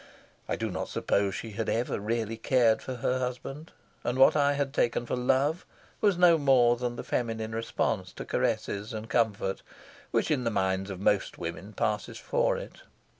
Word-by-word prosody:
I - - +1
do - - -3
not - - -3
suppose 100 -1 0
she 115 - -6
had 110 +2 -3
ever 120 -1 0
really 115 +1 -2
cared 115 -2 +3
for 130 - -5
her 125 +2 0
husband, 130 +4 -5 0.3
and 120 +1 -1
what 135 - +6
I 145 -1 +3
had 140 -1 -1
taken 120 -2 +1
for - - -2
love 135 +6 +1 0.4
was 205 -4 +3
no 175 -2 +6
more 130 -4 +5
than 120 0 -3
the - - -6
feminine 110 -2 -2
response 115 +1 -1
to - - -7
caresses 105 +4 -1
and 110 0 -5
comfort 105 -5 0 0.5
which - - 0
in 135 -5 +1
the 115 - +1
minds 95 -2 0
of 95 -2 -6
most 100 0 +1
women 85 +5 -6
passes 105 0 -2
for - - +1
it. - - -9
120 Hz, 180 wpm, -28 LUFS, 110-130 Hz, 0.5 s, what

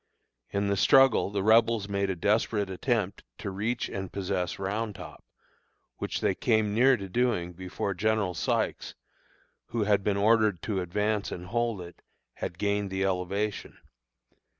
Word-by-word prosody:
In 100 0 -1
the 100 0 +1
struggle 135 0 +5
the 100 -1 -2
Rebels 110 -1 +4
made 100 -1 -1
a 95 - -1
desperate 105 +2 +1
attempt 105 0 -1
to 100 - -5
reach 105 +6 -2
and 95 -1 -5
possess 90 -2 -2
Round 105 +2 -3
Top, - - -10 0.7
which - - -3
they - - +2
came 110 -3 +1
near 130 +4 +5
doing 100 -3 -1
before 95 +2 -4
General 105 -1 0
Sykes, - - -1 0.7
who 115 -2 -1
had 100 -1 +2
been 100 -1 +1
ordered 105 -3 +3
to 100 -4 -1
advance 105 +4 -1
and 90 - -6
hold 115 0 -1
it, 85 0 -11 0.3
had 85 - -5
gained 100 0 0
the 95 0 -1
elevation. 95 +3 -2
100 Hz, 150 wpm, -28 LUFS, 95-110 Hz, 0.7 s, struggle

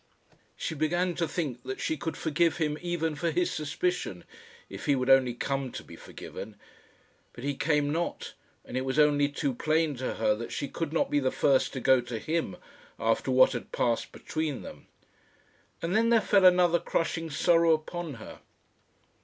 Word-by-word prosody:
She - - -3
began 175 +4 0
to 165 -1 -1
think 145 -7 -3
that 130 +2 -6
she 160 - -1
could 160 +1 -5
forgive 165 +1 +1
him, 150 -3 0
even 170 -2 -1
for 165 +3 -1
his 175 +2 0
suspicion, 150 - -2 0.4
if - - -8
he 145 - +4
would 130 0 +1
only 130 -2 +5
come 135 0 -2
to - - -6
be - - -12
forgiven. 105 0 -9 0.8
But 120 - -10
he 140 0 0
came 145 0 +1
not, 170 +3 -3 0.3
and - - -8
it 130 - +1
was 130 +2 -2
only 145 -1 +4
too 140 -1 -2
plain 155 +3 +1
to 130 - -3
her 105 - +2
that 115 +2 -6
she 140 - -3
could 165 0 -4
not 165 - 0
be 145 - +3
the 130 -2 +1
first 135 0 +2
to 130 - -3
go 130 0 +4
to 120 -1 -5
him 160 +8 -2 0.4
after - - 0
what - - +6
had - - -6
passed - - 0
between 155 -4 -4
them. - - -11 1.0
And 170 +4 -1
then 230 +1 +3
there 235 -1 +5
fell 200 -2 +3
another 180 -1 +5
crushing 165 0 -2
sorrow 165 +3 +3
upon 160 -1 -4
her. 110 - -11
155 Hz, 185 wpm, -28 LUFS, 135-170 Hz, 1.0 s, what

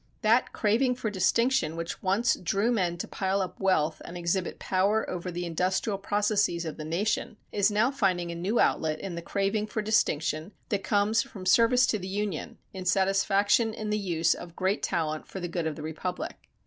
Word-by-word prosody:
That 230 +4 +3
craving 240 +4 +2
for 225 -3 -3
distinction 210 -3 +2
which 165 0 -5
once 200 +5 +2
drew 195 +7 0
men 180 -7 0
to - - -4
pile 195 0 -1
up 185 -2 -4
wealth 160 -5 +1
and 175 - -8
exhibit 175 +1 -1
power 200 +4 +1
over 180 0 -4
the 175 0 -4
industrial 185 +4 -1
processes 205 -4 +1
of 160 - -5
the 155 - -6
nation, 195 +7 -1
is 200 0 +3
now 215 +5 +2
finding 185 -9 0
a - - -5
new 190 +7 0
outlet 155 -1 +2
in 195 - -5
the 170 - -5
craving 200 +4 -1
for 215 0 -3
distinction 165 -4 0 0.2
that 200 -2 -1
comes 210 +2 +2
from 190 -3 -9
service 235 +6 +5
to 215 - 0
the 185 - -6
Union, 200 -4 -3 0.2
in 190 -1 -6
satisfaction 195 +4 +2
in 215 -1 -4
the 210 - +1
use 170 -4 +1
of 170 -1 -10
great 190 +3 0
talent 155 -2 -2
for 190 - -7
the 175 - -3
good 170 -1 -2
of 155 - -3
the 150 - -8
republic. 160 +3 -5
195 Hz, 195 wpm, -28 LUFS, 170-210 Hz, 0.2 s, service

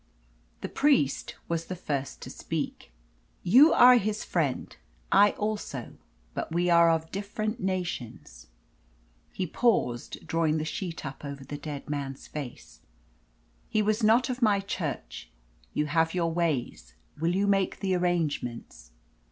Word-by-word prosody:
The - - -3
priest 270 - +1
was 165 -1 -2
the 185 - -5
first 140 -6 -4
to - - -7
speak. - - -5 0.5
"You 260 - +7
are 250 0 +8
his 215 -1 -1
friend, - - -1 0.4
I 205 +1 +6
also; 205 - -4 0.4
but - - -4
we 175 +1 +1
are 170 0 +6
of 160 0 0
different 215 +3 -3
nations." 175 - -4 0.8
He 185 - -2
paused, 165 - 0
drawing 160 -1 +1
the 155 - -2
sheet 165 0 -5
up 135 +2 -7
over 140 -1 -6
the 145 - -6
dead 145 -1 -6
man's 140 -2 -4
face. 125 - -8 0.9
"He 215 - +2
was 215 +2 +1
not 225 +4 +4
of 255 0 -4
my 210 -3 +4
Church. 160 - -5 0.5
You 150 - +1
have 165 +3 +1
your 165 -2 0
ways; 135 - -2 0.2
will 170 +3 +1
you 200 +1 +2
make 195 -1 +1
the 190 -1 0
arrangements?" 150 - -2
170 Hz, 140 wpm, -28 LUFS, 145-200 Hz, 0.9 s, are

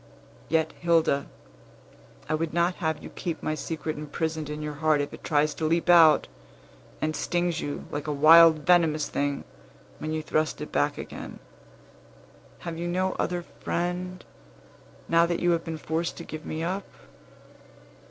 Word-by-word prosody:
Yet, 160 0 +2
Hilda, 165 -5 +2 1.0
I - - -1
would 160 +1 -2
not 175 +1 +2
have 160 -4 -2
you - - -9
keep 170 -3 -5
my 155 - 0
secret 155 0 -4
imprisoned 155 0 -3
in 150 0 -5
your 150 0 -4
heart 155 -2 +3
if 145 - -3
it - - -11
tries 150 0 +2
to 160 - -3
leap 170 +2 +2
out, 160 -3 +7 0.7
and 155 0 -1
stings 175 -1 -1
you, 145 - -5
like 145 +1 -4
a - - 0
wild, 160 +2 +7
venomous 160 -4 +3
thing, 140 0 -1 0.6
when 155 - -4
you 155 0 -2
thrust 155 0 0
it 150 - -6
back 70 - +1
again. - - -8 1.2
Have 165 -1 -5
you 175 - -2
no 185 +2 0
other 175 0 -1 0.2
friend, 180 +1 -3 0.8
now 170 0 +4
that 170 0 -1
you 175 - +2
have 165 -1 +1
been 160 -1 -5
forced 160 +2 -3
to 170 - -7
give 155 -1 -8
me 160 +1 -3
up?" 190 +4 -3
160 Hz, 160 wpm, -26 LUFS, 155-170 Hz, 1.2 s, out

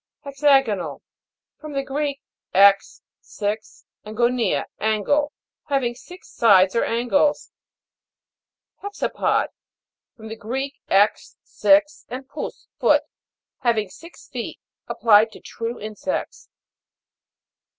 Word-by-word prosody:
HEXA'GONAL. 270 -8 +1 0.6
From 305 -1 -8
the 275 0 -1
Greek, 280 +1 -3 0.3
'ex, 195 +1 +4 0.2
six, 210 +1 -5 0.2
and 215 0 -9
gonia, 240 0 +1
angle. 220 +8 +1 0.3
Having 270 -5 0
six 360 +9 -14
sides 195 -4 +4
or 230 - +2
angles. 245 +6 +1 1.3
HEX' 405 0 -7
APOD. - - +1 0.7
From 220 -1 -10
the 220 - -6
Greek, 265 +6 -5
'ex, 200 +2 +2
six, 300 +1 +2
and 260 +1 -7
pous, 290 - -7
foot. - - +4 0.6
Having 230 -6 0
six 335 - -14
feet. - - -6 0.3
Applied 220 -1 +4
to - - -12
true 230 +1 -6
insects. 215 +6 -5
240 Hz, 105 wpm, -22 LUFS, 215-285 Hz, 1.3 s, ex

